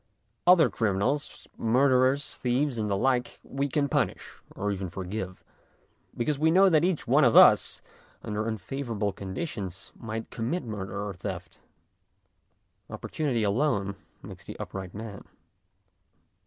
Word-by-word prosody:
Other 175 -3 +6
criminals, 110 +7 -1
murderers, 130 +3 +3
thieves, 125 0 0
and 105 -1 -1
the 100 - +1
like, 125 +2 0
we 140 +1 -2
can 140 +1 +1
punish - - -2 0.2
or 105 +1 -1
even 95 -2 -3
forgive, 95 +1 -6 0.7
because 140 +4 0
we 160 +1 +4
know 190 +4 +6
that 160 -2 +4
each 180 -3 0
one 140 +5 +5
of 120 -3 +4
us - - +6 0.4
under 105 +1 -2
unfavourable 110 -1 -3
conditions 95 - -5
might 115 0 -6
commit 125 +11 -2
murder 100 -2 -5
or 100 - -5
theft; 90 - -7 1.3
opportunity 135 -8 -2
alone 100 -3 +1 0.3
makes - - -10
the - - -8
upright 95 -1 -6
man. 110 -2 -7
115 Hz, 130 wpm, -28 LUFS, 100-140 Hz, 1.3 s, Other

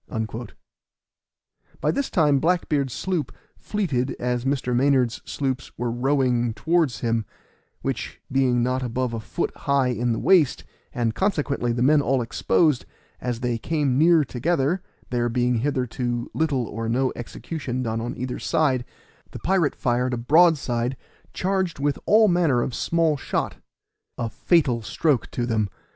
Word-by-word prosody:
By - - +1
this 280 -1 -1
time 150 -7 +3
Black 175 +4 +1
beard's 140 -4 0
sloop 180 +3 -2 0.2
fleeted 145 - -2
as 125 0 -1
Mr. 130 -3 0
Maynard's 130 -2 +2
sloops 135 -2 -3
were 120 -1 -1
rowing 125 -2 +1
towards 165 -6 +1
him, 115 -1 0 0.6
which - - -3
being 130 -2 +2
not 130 +1 0
above 125 0 -2
a 115 - -2
foot 110 +10 -3
high 140 -3 +1
in 120 0 0
the 115 - 0
waist, 165 - +3 0.3
and 115 -2 -1
consequently 145 - 0
the 120 +1 0
men 145 +2 +5
all 135 -2 +1
exposed, 130 +4 +2 0.4
as 120 -1 -3
they 120 -2 -1
came 145 -2 0
near 165 0 +5
together 150 +6 0 0.3
(there 120 -1 +1
being 120 0 +1
hitherto 125 -2 -2
little 145 -6 0
or 115 +1 -4
no 130 +3 +1
execution 130 +1 -5
done 115 -1 -2
on 120 +1 -4
either 125 +1 -4
side), 130 -6 +1 0.5
the - - -8
pirate 180 -6 +1
fired 125 0 0
a - - -4
broadside 135 -3 +3 0.3
charged 190 -2 -1
with 145 +1 -1
all 215 +1 +6
manner 165 -10 +3
of 130 - -4
small 165 0 +1
shot. - - -2 0.6
A 115 -2 -3
fatal 135 -8 +2
stroke 145 +4 0
to 120 - -2
them! 110 -4 0
130 Hz, 150 wpm, -24 LUFS, 120-155 Hz, 0.6 s, all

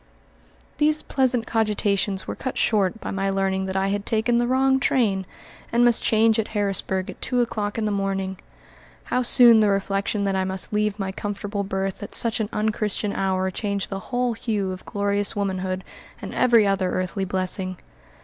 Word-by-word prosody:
These 305 0 +3
pleasant 255 -4 +1
cogitations 205 -3 0
were - - -4
cut 260 - -5
short 210 -1 +1
by - - -5
my 195 0 -1
learning 195 0 0
that 190 0 -3
I 195 0 +1
had 200 0 -1
taken 230 +3 +1
the 240 - +1
wrong 265 +1 +3
train, 200 -9 +1 0.4
and 240 +1 +4
must 240 -2 +3
change 220 0 +3
at 220 - -1
Harrisburg 190 -2 0
at - - -16
two 250 - 0
o'clock 215 -3 -1
in 220 - -1
the 210 - 0
morning. 195 -1 -2 0.6
How 250 - 0
soon 240 -2 +7
the 210 -1 +4
reflection 200 +1 -1
that 195 -1 0
I 190 - +1
must 190 +2 -3
leave 210 -1 0
my 195 -2 -3
comfortable 205 +1 -4
berth 195 -1 -3
at 205 - -4
such 230 -1 +3
an 215 -2 -1
unchristian 210 -1 -1
hour 190 -1 0
changed 200 0 -3
the 195 - -3
whole 245 -1 0
hue 215 -4 -2
of 185 0 -9
glorious 205 +1 0
womanhood 190 -2 -2 0.4
and - - -7
every 235 -4 +4
other 195 -2 +1
earthly 185 +1 -2
blessing! 185 0 -2
205 Hz, 180 wpm, -23 LUFS, 190-225 Hz, 0.6 s, soon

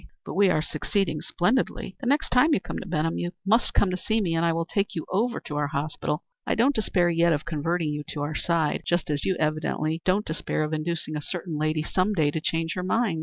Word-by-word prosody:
But - - -5
we 200 -1 +4
are 155 -3 +2
succeeding 160 0 -1
splendidly. 200 0 0
The 260 - -4
next 285 +4 +2
time 275 +5 +5
you - - +1
come - - -5
to - - -8
Benham 165 -1 0
you 175 +1 -3
must 225 +4 +3
come 195 - +4
to 185 - -1
see 220 +4 0
me, 180 -6 0
and 165 0 +1
I 170 - +3
will 165 0 -1
take 200 +3 -1
you 160 - -3
over 235 +5 +1
our 145 0 0
hospital. 150 0 -2 0.2
I - - +2
don't 260 +5 +4
despair 180 -7 +2
yet 170 0 +3
of 150 0 -2
converting 165 +1 -1
you 150 0 -3
to 145 - -4
our 150 +2 -2
side, 165 -1 +1
just 175 -2 0
as 145 -1 -1
you 190 - +2
evidently 155 +1 0
don't 190 +3 +2
despair 155 -1 -1
of 155 +1 -3
inducing 155 0 -2
a 150 - -2
certain 170 +1 -4
lady 155 +1 0
some 185 +5 +1
day 155 -6 +2
to 160 - -2
change 165 +1 -1
her 180 - -3
mind. 190 -2 +1
170 Hz, 240 wpm, -26 LUFS, 155-195 Hz, 0.2 s, time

